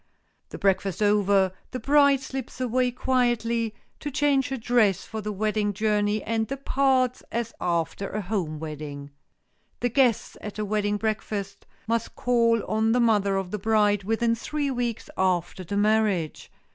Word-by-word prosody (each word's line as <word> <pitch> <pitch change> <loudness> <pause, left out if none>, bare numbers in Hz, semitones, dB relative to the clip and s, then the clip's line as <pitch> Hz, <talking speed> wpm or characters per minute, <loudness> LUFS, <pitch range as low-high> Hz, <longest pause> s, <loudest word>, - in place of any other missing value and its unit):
The - - -7
breakfast 195 0 +1
over, 200 -2 +3 0.2
the 255 - -5
bride 280 +1 +4
slips 265 -2 -6
away 250 0 +1
quietly, 235 -3 0 0.2
to 295 - -4
change 285 -1 +1
her 270 - -2
dress 225 -5 +2
for 220 -1 -5
the 210 0 -3
wedding 210 0 0
journey, 210 0 +1
and 225 -1 -1
departs 265 -2 +1
as 230 0 -2
after 170 +3 -1
a 210 - -3
home 180 -6 -2
wedding. 145 -2 -7 0.7
The 245 - 0
guests 245 -2 +2
at 210 0 -7
a 215 - -2
wedding 205 0 0
breakfast 210 -2 -3 0.2
must 230 0 -2
call 230 -2 +2
on 220 +2 +1
the 250 - +3
mother 205 -4 +3
of 190 -2 -3
the 210 - -3
bride 210 -1 +2
within 225 +3 +1
three 285 +5 -2
weeks 240 -3 -2
after 185 0 0
the 200 +4 -3
marriage. 205 -6 +1
220 Hz, 155 wpm, -26 LUFS, 200-245 Hz, 0.7 s, bride